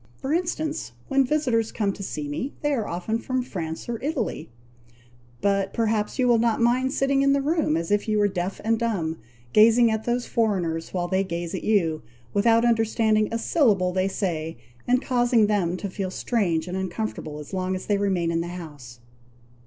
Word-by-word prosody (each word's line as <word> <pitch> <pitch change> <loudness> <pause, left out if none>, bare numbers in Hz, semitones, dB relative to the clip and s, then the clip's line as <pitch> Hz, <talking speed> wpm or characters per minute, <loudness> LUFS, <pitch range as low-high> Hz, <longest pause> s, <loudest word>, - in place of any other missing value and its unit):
For 270 - -3
instance, 320 -3 -2 0.2
when 275 -1 +4
visitors 250 -6 +1
come 200 -3 -1
to 200 - -10
see 150 -6 -4
me, 195 - -4
they 295 0 +2
are 225 -6 -1
often 200 +6 -2
from 255 +1 -2
France 165 -8 -5
or 235 -2 -4
Italy; 270 - -3 0.9
but 195 0 +1
perhaps 220 -2 0
you 255 -2 +2
will 235 -2 +4
not 230 -1 +2
mind 250 +3 +2
sitting 275 0 +2
in 275 0 +4
the 280 - +2
room 295 - +1
as 165 +2 -3
if 205 +1 +1
you 215 -1 +1
were 205 0 +4
deaf 185 -1 -3
and 225 +1 +1
dumb, 175 -9 -1 0.3
gazing 230 +2 +6
at 220 0 -2
those 240 0 0
foreigners, 180 -8 -1
while 175 -1 -1
they 190 +1 +1
gaze 170 -1 -4
at 190 - -4
you, 170 -8 +1 0.3
without 230 +3 +4
understanding 225 -2 +2
a 230 - 0
syllable 215 - +2
they 185 +1 +1
say, 165 - -3 0.3
and 250 +1 +2
causing 240 -3 +3
them 190 -4 0
to 200 - -4
feel 190 0 -4
strange 185 -6 0
and 180 - -4
uncomfortable 190 -4 -4
as 150 +5 -10
long 185 0 -1
as 185 - -6
they 205 -1 +1
remain 185 -4 +1
in 165 0 0
the 170 - -4
house." 145 -9 -9
210 Hz, 190 wpm, -25 LUFS, 180-235 Hz, 0.9 s, gazing